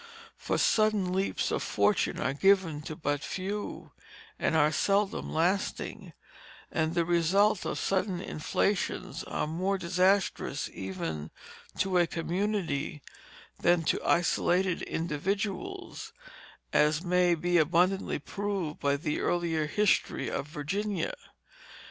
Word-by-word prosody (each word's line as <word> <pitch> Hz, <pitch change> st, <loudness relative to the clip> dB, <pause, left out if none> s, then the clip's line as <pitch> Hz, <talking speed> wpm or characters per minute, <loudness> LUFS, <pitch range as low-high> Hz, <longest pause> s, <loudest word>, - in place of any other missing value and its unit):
For -, -, -2 dB
sudden 215 Hz, -4 st, +2 dB
leaps 190 Hz, +1 st, 0 dB
to -, -, 0 dB
fortune 210 Hz, -, +1 dB
are 130 Hz, -, 0 dB
given 185 Hz, -2 st, +3 dB
to 155 Hz, -, -5 dB
but 145 Hz, -2 st, -1 dB
few, 200 Hz, +5 st, -5 dB, 0.5 s
and -, -, +1 dB
are 150 Hz, 0 st, +4 dB
seldom 200 Hz, +5 st, +1 dB
lasting, 180 Hz, +5 st, -1 dB, 0.6 s
and 160 Hz, +1 st, 0 dB
the 170 Hz, -1 st, +2 dB
results 180 Hz, +5 st, +3 dB
of -, -, -2 dB
sudden 190 Hz, -1 st, 0 dB
inflations 185 Hz, +3 st, -1 dB
are -, -, -2 dB
more 185 Hz, +6 st, -1 dB
disastrous 185 Hz, +2 st, +1 dB
even 80 Hz, -5 st, -4 dB, 0.5 s
to 185 Hz, -2 st, +2 dB
a 175 Hz, -, +3 dB
community 170 Hz, -5 st, -2 dB, 0.6 s
than 175 Hz, -1 st, +3 dB
to -, -, 0 dB
isolated 175 Hz, +1 st, +2 dB
individuals, 200 Hz, -, -3 dB, 0.6 s
as 150 Hz, +2 st, +3 dB
may 180 Hz, -1 st, +3 dB
be 175 Hz, +2 st, +2 dB
abundantly 175 Hz, +5 st, +2 dB
proved 195 Hz, 0 st, -3 dB
by 140 Hz, 0 st, +1 dB
the 150 Hz, +1 st, -2 dB
early 175 Hz, -1 st, 0 dB
history 210 Hz, +5 st, +1 dB
of 140 Hz, -, -3 dB
Virginia. 195 Hz, -, -2 dB
175 Hz, 115 wpm, -29 LUFS, 160-195 Hz, 0.6 s, are